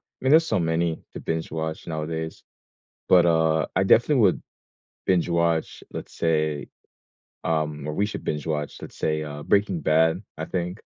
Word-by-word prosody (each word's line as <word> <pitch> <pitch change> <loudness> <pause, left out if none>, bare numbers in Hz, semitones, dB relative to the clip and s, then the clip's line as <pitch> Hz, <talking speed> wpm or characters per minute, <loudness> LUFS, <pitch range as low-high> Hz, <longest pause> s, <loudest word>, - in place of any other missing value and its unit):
I - - -20
mean, 130 - +3
there's 160 +2 +6
so 110 -10 +1
many 80 0 0
to - - -7
binge 80 0 -3
watch 80 0 -4
nowadays, 80 0 -4 0.7
but, 90 -2 +6
uh, 80 -1 +3
I - - +4
definitely 120 +5 +4
would 95 -4 +3 0.6
binge 90 -2 +2
watch, 85 -1 0
let's - - -7
say, 75 -3 0 0.8
um 75 -2 -1
or 75 - -2
we 100 +6 +1
should 105 - -6
binge 75 0 -3
watch, 75 -2 -2
let's - - -10
say, 75 0 0
uh, 75 -1 -7
Breaking 100 -4 +2
Bad, 80 +3 +3 0.2
I - - -3
think. 90 +2 -3
80 Hz, 170 wpm, -25 LUFS, 80-90 Hz, 0.8 s, there's